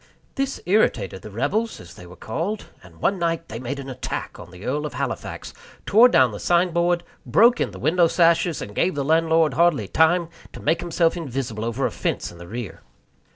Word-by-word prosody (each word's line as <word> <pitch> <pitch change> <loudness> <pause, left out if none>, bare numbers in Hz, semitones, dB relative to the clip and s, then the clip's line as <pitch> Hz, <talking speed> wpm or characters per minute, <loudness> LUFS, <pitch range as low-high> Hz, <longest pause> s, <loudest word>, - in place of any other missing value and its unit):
This 275 0 -2
irritated 110 - +1
the 105 - -9
rebels, 165 - -1
as 85 - -12
they 90 - -13
were 90 - -12
called; 175 - -4 0.2
and 85 -3 -17
one 195 -1 +1
night 165 -1 -1
they 115 - -6
made 130 +3 -4
an 135 -1 -7
attack 130 -1 -5
on - - -10
the 90 +2 -12
Earl 150 +4 -1
of 140 - -10
Halifax, 135 0 -4 0.3
tore 230 +5 +6
down 130 - +4
the 105 - -7
signboard, 175 0 +2 0.2
broke 240 +2 +4
in - - +1
the - - -11
window 170 +3 +3
sashes, 170 -1 +2
and 105 - -9
gave 175 - +1
the 140 -1 -2
landlord 160 -1 +3
hardly 150 - +2
time 165 - +2 0.2
to - - -9
make 160 +3 +1
himself 170 -1 +1
invisible 130 -9 -4
over 115 +4 -1
a - - 0
fence - - -3
in 85 - -14
the 85 - -10
rear. 115 +1 -7
160 Hz, 200 wpm, -23 LUFS, 115-175 Hz, 0.3 s, tore